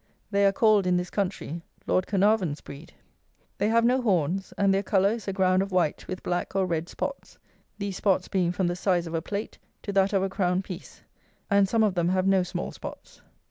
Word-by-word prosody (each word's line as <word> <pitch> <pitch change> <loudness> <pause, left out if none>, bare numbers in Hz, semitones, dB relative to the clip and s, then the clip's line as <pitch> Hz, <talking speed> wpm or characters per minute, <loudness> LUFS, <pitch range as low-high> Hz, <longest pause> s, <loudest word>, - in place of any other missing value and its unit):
They 200 0 +4
are - - +4
called, 210 -2 +3
in 180 0 +3
this 180 0 -3
country, 180 -4 -3 0.2
Lord 185 - +1
Caernarvon's 195 -6 +2
breed. 145 +4 -11 0.7
They 205 - +2
have 230 +1 +3
no 255 +2 +3
horns, 190 - 0
and 200 -1 +3
their 195 - +2
colour 195 0 +2
is 225 -3 -5
a - - 0
ground 185 -1 +2
of 195 0 -3
white 180 -5 0
with 185 - -6
black 175 +2 -2
or 195 -1 +2
red 170 -1 -2
spots, 275 -1 -5 0.4
these 200 -2 -4
spots 195 -3 +1
being 180 -3 +1
from 180 +1 -1
the 175 0 0
size 180 -1 +1
of 165 - -7
a 165 - 0
plate 205 +4 -5 0.2
to 200 - -4
that 195 0 +3
of 195 -2 +2
a - - +1
crown 185 -1 0
piece; 185 -1 -10 0.5
and 200 -1 +4
some 225 +1 +3
of 210 -3 +2
them 175 -1 +1
have 185 0 +1
no 195 -1 +4
small 180 - -4
spots. - - -10
190 Hz, 220 wpm, -26 LUFS, 180-200 Hz, 0.7 s, They